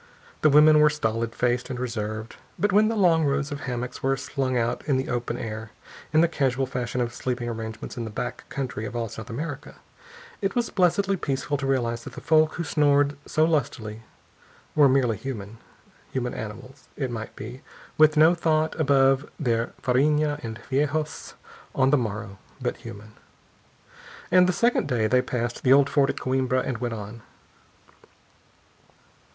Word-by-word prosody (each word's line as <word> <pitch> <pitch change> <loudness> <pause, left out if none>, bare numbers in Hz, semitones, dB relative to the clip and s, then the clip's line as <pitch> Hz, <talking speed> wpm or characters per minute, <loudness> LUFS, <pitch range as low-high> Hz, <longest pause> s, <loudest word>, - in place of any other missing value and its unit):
The 155 - +5
women 150 +1 +7
were 150 0 +6
stolid 115 -5 -2
faced 125 +1 0
and 125 -2 -4
reserved. 110 -2 -4 0.2
But 205 +1 +1
when 210 +3 +5
the 225 - 0
long 170 -6 +4
rows 140 0 0
of 145 - -4
hammocks 125 -2 -5
were 135 0 +1
slung 130 -1 -2
out 120 0 -1
in 140 -3 +2
the 130 - -2
open 120 -1 -2
air, 110 -1 -5 0.4
in 155 +1 +5
the 170 - +5
casual 135 -5 0
fashion 125 -1 -3
of 120 -1 -2
sleeping 125 -1 -3
arrangements 110 0 -6
in 120 - -3
the 110 - -5
back 120 +3 -5
country 125 -5 -4
of 120 - -6
all 115 -2 -2
South 110 +3 -9
America, 145 +3 -6 0.7
it 195 -1 -1
was 240 -2 0
blessedly 195 +1 +2
peaceful 140 -2 -2
to 135 -1 -3
realize 120 -3 0
that - - -9
the - - -7
folk 155 0 +3
who 170 - -2
snored 145 -2 +2
so 155 - +2
lustily 125 -9 -2 0.7
were 145 -3 +6
merely 125 -5 +2
human; 115 -4 -7 0.5
human 125 -2 -2
animals, 125 +6 -8
it 130 -4 -2
might 110 -1 -6
be, 120 +5 -8 0.4
with 155 0 +6
no 160 +3 +7
thought 160 -2 +1
above 135 -1 +3
their 115 -5 +1 0.2
farinha 150 +3 +2
and 110 -1 -5
feijos 150 +3 -2 0.4
on 130 0 +3
the - - +6
morrow, 105 -4 -4 0.2
but - - -2
human. 105 +2 -10 1.2
And 180 0 +6
the - - +4
second 235 -3 +1
day 120 -5 +1
they 125 +4 +3
passed 120 -1 -3
the 130 - +5
old 140 0 +4
fort 140 -2 +3
at - - -3
Coimbra, 130 -1 0
and 125 -4 -3
went 120 -2 -2
on. 105 +2 -8
130 Hz, 170 wpm, -25 LUFS, 115-150 Hz, 1.2 s, women